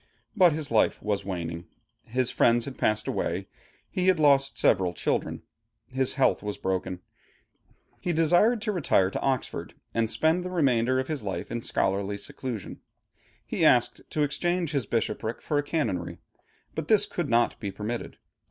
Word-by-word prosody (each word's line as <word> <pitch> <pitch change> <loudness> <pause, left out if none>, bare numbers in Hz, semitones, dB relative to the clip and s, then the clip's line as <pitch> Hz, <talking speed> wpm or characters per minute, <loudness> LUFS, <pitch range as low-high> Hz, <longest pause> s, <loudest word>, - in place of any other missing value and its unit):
But 185 -5 +6
his 150 -3 -4
life 110 - +3
was 100 -1 -1
waning. 85 -3 -4 0.4
His 125 +1 0
friends 120 0 +3
had 135 - -7
passed 105 0 +1
away, - - -2 0.4
he 185 0 -1
had 185 -1 +5
lost 140 -2 +4
several 90 -3 +3
children, - - -2 0.4
his 130 0 -1
health 135 - +2
was 105 -1 -4
broken. 95 -1 -2 1.0
He 175 - -2
desired 175 +8 +3
to 215 - 0
retire 120 - +2
to - - -3
Oxford 130 -2 -2 0.2
and 115 -1 +1
spend 160 +7 +2
the 180 - -4
remainder 130 -7 +2
of 130 - -2
his 155 -3 -3
life 100 -2 -4
in 115 - -2
scholarly 100 -1 0
seclusion. 115 0 -6 0.7
He - - -2
asked 120 0 +4
to 150 - 0
exchange 170 +3 0
his 140 -7 -1
bishopric 115 0 -2
for 145 - -1
a - - -1
canonry, 120 - -2 0.6
but 160 -1 -4
this 205 0 +5
could 175 -8 -3
not 120 0 +2
be 100 - -3
permitted. 110 +4 -5
130 Hz, 160 wpm, -27 LUFS, 105-160 Hz, 1.0 s, But